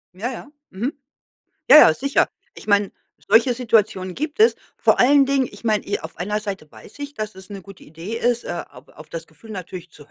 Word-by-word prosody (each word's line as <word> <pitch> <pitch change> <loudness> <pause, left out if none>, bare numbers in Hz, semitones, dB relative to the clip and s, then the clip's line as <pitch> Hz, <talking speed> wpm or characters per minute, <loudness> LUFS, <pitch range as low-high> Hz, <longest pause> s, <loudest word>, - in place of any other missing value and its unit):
Ja, 225 +7 -3
ja, 270 +3 -9 0.2
mhm. 235 +9 -3 0.8
Ja, - - +11
ja, 160 - +8
sicher. 275 - +1 0.3
Ich - - -13
meine, 205 -1 +2 0.4
solche 240 +2 +4
Situationen 215 -6 +1
gibt 305 +5 -5
es. 445 - +5 0.2
Vor - - +2
allen 280 +2 +6
Dingen, 270 -1 +1
ich - - -14
meine, 215 -3 0
i 200 - -2
auf - - -9
einer 210 +4 -2
Seite 195 -7 -6
weiß - - -15
ich, 285 0 -7
dass 215 -4 -5
es 190 -1 -11
'ne 200 -2 -8
gute 195 0 -14
Idee 170 +9 -7
ist, 240 0 0
äh, 175 - -4
auf 125 +2 -17
auf 155 0 -15
das 165 0 -7
Gefühl 160 +8 -16
natürlich 180 -3 -8
zu 145 -1 -17
210 Hz, 215 wpm, -21 LUFS, 185-250 Hz, 0.8 s, Ja